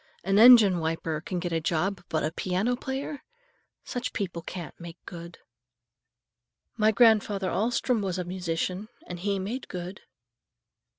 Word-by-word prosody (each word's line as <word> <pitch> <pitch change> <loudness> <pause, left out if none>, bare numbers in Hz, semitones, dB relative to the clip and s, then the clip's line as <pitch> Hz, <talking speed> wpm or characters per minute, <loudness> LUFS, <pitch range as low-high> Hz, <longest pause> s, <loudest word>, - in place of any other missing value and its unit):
An 195 +1 +2
engine 220 -6 +8
wiper 160 -1 -2
can 180 +2 -4
get 175 0 -3
a 165 - 0
job, 175 +4 -1
but 155 - 0
a 155 - -1
piano 185 +8 -1
player! 270 +3 -5 0.6
Such 245 0 -4
people 180 -5 -3
can't 175 0 -7
make 170 -1 -9
good." 170 0 -9 1.4
"My 215 -1 +3
grandfather 210 -4 +3
Alstrom 235 +1 0
was 190 -2 -2
a 180 - -2
musician, 180 +2 -3 0.2
and 175 -1 -7
he 200 +2 -1
made 210 +8 -4
good." 180 +1 -7
190 Hz, 140 wpm, -27 LUFS, 170-215 Hz, 1.4 s, engine